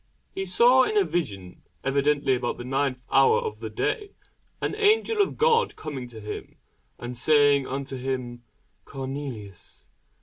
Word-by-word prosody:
He 195 0 -4
saw 245 +8 +5
in 425 +10 +1
a 410 - +5
vision 100 - -4 0.2
evidently 140 0 +2
about 120 -1 -2
the - - -7
ninth 135 0 0
hour 450 +1 +5
of 465 -2 -4
the - - -5
day 415 -2 -2 0.5
an - - -2
angel 435 +1 +3
of 400 - 0
God 470 +1 +3
coming 140 -5 -6
in - - -12
to 115 -2 -10
him, 105 0 -8 0.4
and 120 +1 -7
saying 145 +1 +4
unto 135 0 -4
him, 125 -2 -4 0.4
Cornelius. 130 -8 -7
140 Hz, 155 wpm, -25 LUFS, -, 0.5 s, saw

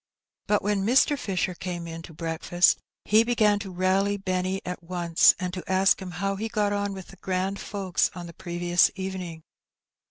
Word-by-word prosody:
But 210 - +2
when 205 -1 0
Mr. 260 +7 +4
Fisher 190 -7 -2
came 175 -1 -5
in 165 0 -7
to 165 - -11
breakfast 165 +2 +2 0.3
he 215 +2 +5
began 215 -3 +2
to 200 -2 -6
rally 190 +2 +1
Benny 185 0 -1
at 180 0 -5
once, 170 -1 +3
and 180 -1 -4
to 185 0 -6
ask 190 +2 +3
him 190 - -6
how 195 +2 -2
he 220 +3 -3
got 210 -2 0
on 205 0 -1
with 190 -2 -9
the 195 - -14
grand 190 +1 -2
folks 195 -4 -1
on 175 -1 -6
the 170 - -10
previous 175 +1 +2
evening. 185 -4 -5
190 Hz, 185 wpm, -26 LUFS, 175-200 Hz, 0.3 s, he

